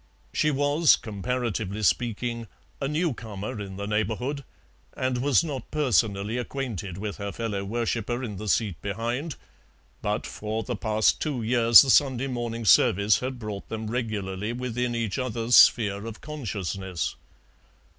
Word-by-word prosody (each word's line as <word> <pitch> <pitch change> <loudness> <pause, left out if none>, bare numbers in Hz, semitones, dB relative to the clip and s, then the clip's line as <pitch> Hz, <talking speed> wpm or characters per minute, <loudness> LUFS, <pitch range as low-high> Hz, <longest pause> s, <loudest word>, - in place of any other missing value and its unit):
She 155 - +2
was, 145 +2 +4
comparatively 110 -1 -3
speaking 115 +1 0 0.3
a 135 - 0
new 155 +1 0
comer 105 -2 -6
in 95 -1 -7
the 100 - -4
neighbourhood, 110 +7 -1 0.5
and 130 -1 0
was 140 +3 +3
not 140 -7 -5
personally 110 - +1
acquainted 115 -8 -4
with 105 0 -5
her 100 -1 -4
fellow 105 -4 -3
worshipper 120 +3 -2
in 105 -5 -5
the 105 +2 -6
seat 100 -5 0
behind, 120 - -3 0.7
but - - -1
for 110 +1 -4
the 120 +3 -3
past 110 -2 +1
two 140 -7 -2
years 115 +1 +7
the 135 - +2
Sunday 135 -2 +3
morning 120 -3 -3
service 100 +3 +5
had 130 0 -4
brought 105 -4 -6
them 110 -1 -4
regularly 105 -3 -3
within 125 -1 -2
each 115 +1 -2
other's 120 -1 +1
sphere 105 -1 +5
of 115 0 -8
consciousness. 100 - -4
115 Hz, 145 wpm, -26 LUFS, 105-125 Hz, 0.7 s, years